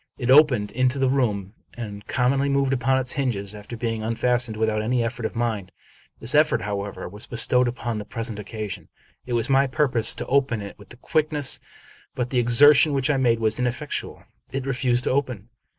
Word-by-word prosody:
It 125 0 0
opened 130 -8 +5
into 130 +2 +1
the 135 -1 +2
room, 105 -7 -1 0.2
and 105 -3 -8
commonly 135 +3 +1
moved 140 -1 +1
upon 130 +1 +1
its 130 -1 0
hinges, 110 -9 -2
after 105 +3 -9
being 115 -1 -2
unfastened, 115 0 0
without 110 -1 0
any 120 +2 0
effort 115 0 -3
of - - -13
mine. 110 -5 -2 0.5
This 115 +2 +2
effort, 150 +1 +3
how 100 -1 -2
ever, 100 - -7
was 105 +3 -7
bestowed 125 +2 +2
upon 120 -2 -3
the - - -5
present 115 0 -4
occasion. 100 -4 -6 0.4
It 125 - -3
was 115 -1 +1
my 135 0 +3
purpose 130 -4 +1
to - - -5
open 135 -4 +1
it 100 -1 -7
with 120 - -15
quickness; 150 -3 0 0.6
but 125 -1 -3
the 125 - +2
exertion 145 +5 +6
which 135 +1 +1
I 140 - +1
made 120 -3 +2
was 110 +1 0
ineffectual. 125 -1 -3 0.3
It 135 -1 -3
refused 125 -2 0
to - - 0
open. 125 -6 -2
120 Hz, 190 wpm, -23 LUFS, 110-135 Hz, 0.6 s, exertion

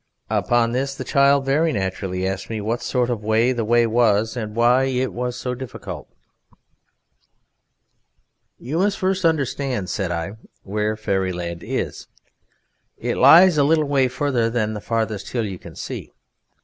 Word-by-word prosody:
Upon 120 -1 +2
this 135 +3 -2
the - - -5
child 140 0 +3
very 155 +4 +2
naturally 95 -4 -2
asked 95 0 -4
me 110 -1 -3
what 110 +3 -2
sort 125 -1 0
of 110 -3 -3
way 110 +3 +2
the 120 -2 -2
way 120 +2 +3
was 110 -1 +2
and 110 -3 -5
why 120 +3 +4
it 130 -1 -1
was 125 0 -3
so 125 - -3
difficult. 125 -2 -8 2.5
"You 145 +8 -3
must 200 +1 +1
first 190 0 0
understand," 135 - 0
said 95 -6 -2
I, 85 +4 -4 0.3
"where 105 +2 -2
Fairyland 90 -5 -2
is: - - -4 0.9
it - - -2
lies 175 -1 +7
a - - +5
little 155 +1 +3
way 140 -2 +2
farther 130 -3 0
than 110 -2 -1
the 105 - -6
farthest 110 -3 -2
hill 120 -3 0
you 95 -3 -6
can - - -12
see. - - -6
120 Hz, 155 wpm, -22 LUFS, 105-135 Hz, 2.5 s, lies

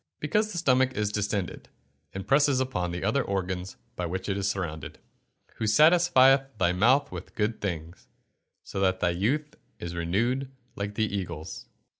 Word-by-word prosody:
_ - - -57
Because 210 +8 0
the 180 - -5
stomach 130 -5 +2
is 105 -1 0
distended, 105 -3 -3 0.4
and 95 +1 -7
presses 140 -1 +4
upon 130 -10 -1
the 85 +1 -4
other 115 +7 +1
organs 95 -1 -3 0.2
by 90 - -2
which 95 +2 -4
it 95 - 0
is 100 0 0
surrounded. 80 -6 -4
[Verse: - - -37
"Who 110 - -1
satisfieth 135 -1 +5
thy 90 -2 +2
mouth 130 +9 +3
with - - -8
good 105 +1 -1
things; 85 -4 -5 0.6
so - - -5
that 95 -1 +2
thy 85 - +2
youth 135 - -1 0.2
is 85 0 -6
renewed 115 +11 0 0.3
like 100 +1 -4
the 110 - +2
eagles." 85 -6 -5
105 Hz, 170 wpm, -27 LUFS, 90-130 Hz, 0.6 s, satisfieth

